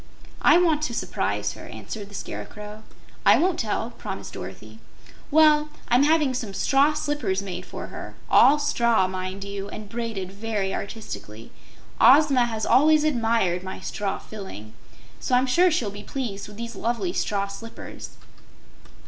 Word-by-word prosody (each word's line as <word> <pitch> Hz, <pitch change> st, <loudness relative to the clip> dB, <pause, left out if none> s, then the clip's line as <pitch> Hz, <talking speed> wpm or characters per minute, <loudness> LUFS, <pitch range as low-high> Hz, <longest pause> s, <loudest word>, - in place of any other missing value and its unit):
"I -, -, +6 dB
want 330 Hz, -4 st, +3 dB
to 235 Hz, -, -3 dB
surprise 100 Hz, -, -2 dB
her," -, -, -11 dB
answered 195 Hz, -, -7 dB
the 200 Hz, -, -11 dB
Scarecrow. 210 Hz, +1 st, -7 dB, 0.4 s
"I -, -, +7 dB
won't 355 Hz, 0 st, +1 dB
tell," 225 Hz, +1 st, -2 dB
promised 195 Hz, -4 st, -7 dB
Dorothy. 95 Hz, +4 st, -9 dB, 0.5 s
"Well, 300 Hz, 0 st, +5 dB, 0.2 s
I'm 245 Hz, +2 st, +5 dB
having 300 Hz, -2 st, +3 dB
some 220 Hz, -6 st, -4 dB
straw 280 Hz, +6 st, +3 dB
slippers 290 Hz, -11 st, -1 dB
made 180 Hz, -1 st, -6 dB
for -, -, -6 dB
her -, -, -8 dB
all 290 Hz, -, +6 dB
straw, 235 Hz, -8 st, +2 dB
mind 185 Hz, +1 st, -5 dB
you, 200 Hz, 0 st, -6 dB
and 215 Hz, -1 st, -8 dB
braided 220 Hz, -4 st, -4 dB
very 200 Hz, -1 st, -2 dB
artistically. 115 Hz, -, -7 dB, 0.5 s
Ozma 265 Hz, -1 st, +6 dB
has 220 Hz, -2 st, -3 dB
always 305 Hz, +2 st, +5 dB
admired 225 Hz, -, +1 dB
my 190 Hz, 0 st, -6 dB
straw 195 Hz, +1 st, -3 dB
filling, 150 Hz, -, -9 dB, 0.5 s
so 250 Hz, -, +1 dB
I'm 250 Hz, +1 st, +4 dB
sure 345 Hz, +8 st, +4 dB
she'll 240 Hz, -11 st, 0 dB
be 205 Hz, +1 st, -8 dB
pleased 210 Hz, -5 st, -5 dB
with 210 Hz, 0 st, -12 dB
these 235 Hz, 0 st, -6 dB
lovely 240 Hz, -, -1 dB
straw 200 Hz, -, 0 dB
slippers." 210 Hz, +3 st, -9 dB
220 Hz, 150 wpm, -25 LUFS, 195-270 Hz, 0.5 s, I